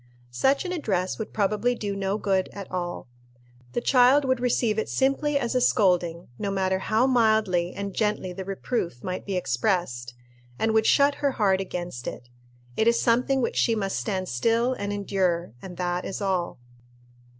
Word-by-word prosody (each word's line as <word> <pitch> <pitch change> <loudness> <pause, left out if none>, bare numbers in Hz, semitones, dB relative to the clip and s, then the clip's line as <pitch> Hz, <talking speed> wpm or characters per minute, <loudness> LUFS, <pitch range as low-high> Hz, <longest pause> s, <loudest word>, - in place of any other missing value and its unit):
Such 270 - +1
an 360 - -3
address 205 - -1
would 220 - -5
probably 210 +4 +1
do 205 -3 -4
no 195 +1 -1
good 190 -3 0
at 200 -2 -8
all. 175 -5 -4 0.7
The - - -1
child 260 +3 +5
would 260 -1 +1
receive 235 -3 +1
it - - -3
simply 280 +2 +1
as 240 -3 -1
a 255 - +2
scolding, 180 -7 +2
no 200 - -2
matter 190 -1 0
how 220 +5 +2
mildly 220 -8 +2
and 200 -1 -4
gently 210 -4 -1
the 190 - -6
reproof 190 - -3
might 185 +2 -4
be 195 - -2
expressed, 125 - -1 0.4
and 220 0 +1
would 220 0 +3
shut 285 0 +5
her 280 -2 +1
heart 195 -4 +2
against 175 -9 -5
it. 120 - -7 0.5
It 220 - +2
is 235 0 +4
something 250 +3 +2
which - - -2
she 230 - +3
must 195 -3 -2
stand 190 -4 -2
still 230 - +1
and 200 -4 -4
endure, 190 - -1
and 180 -2 -9
that 180 0 -1
is 195 - -5
all. 190 -4 -1
200 Hz, 175 wpm, -25 LUFS, 180-235 Hz, 0.7 s, child